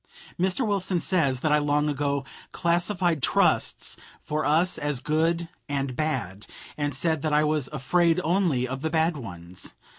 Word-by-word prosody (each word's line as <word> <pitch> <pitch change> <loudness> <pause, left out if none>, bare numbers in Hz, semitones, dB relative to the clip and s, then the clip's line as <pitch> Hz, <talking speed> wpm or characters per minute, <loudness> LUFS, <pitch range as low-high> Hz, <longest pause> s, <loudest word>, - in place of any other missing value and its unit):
Mr. 190 +7 +1
Wilson 195 -3 +1
says 145 -8 +1
that 155 - +1
I 150 - +5
long 145 0 +1
ago 140 -1 -1 0.3
"classified 175 -2 +1
trusts - - +1 0.2
for 155 +1 -3
us 165 +5 +2
as 145 -3 -1
good 165 +4 0 0.2
and 135 -2 -2
bad," 115 - -3 0.3
and 145 -2 -2
said 160 +1 +1
that 155 0 -1
I 150 +1 +4
was 150 -3 +1
"afraid 165 +4 +2
only 165 -7 +1
of 130 +1 -5
the 160 - -1
bad 160 +1 +1
ones." 90 - -8
150 Hz, 155 wpm, -26 LUFS, 140-170 Hz, 0.3 s, I